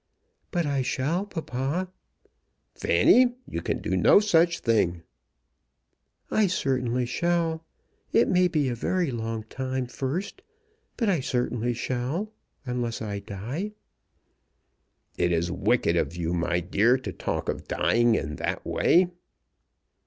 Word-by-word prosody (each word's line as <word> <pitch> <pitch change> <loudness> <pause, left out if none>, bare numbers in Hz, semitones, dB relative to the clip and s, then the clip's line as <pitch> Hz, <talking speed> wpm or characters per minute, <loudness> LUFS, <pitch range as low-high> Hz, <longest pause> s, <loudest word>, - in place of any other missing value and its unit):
"But 175 -3 0
I 140 -2 0
shall, 155 +10 -1
papa." 160 +1 -3 0.8
"Fanny, 245 -1 +4
you - - -4
can - - -2
do - - 0
no - - +6
such 170 -5 +3
thing." 90 -8 +1 1.3
"I 215 -2 +3
certainly 125 -7 0
shall. 165 +4 0 0.5
It 230 - +4
may 180 0 +4
be 155 -5 0
a 125 - -1
very 170 +6 0
long 115 -2 -3
time 130 +3 -3
first; 140 - -4 0.6
but 230 - 0
I 185 -5 +2
certainly 120 -2 -1
shall, 130 - -2 0.3
unless 120 -2 -2
I 105 -2 -4
die." 125 - -5 1.5
"It 90 - +2
is 85 +1 0
wicked 90 -1 +1
of 85 0 0
you, 85 -1 -2
my 85 0 0
dear, 105 +8 +3
to 115 -8 -6
talk - - -3
of - - -3
dying 120 -1 +3
in 75 -6 -3
that - - -3
way." 180 +2 +4
130 Hz, 130 wpm, -26 LUFS, 115-170 Hz, 1.5 s, no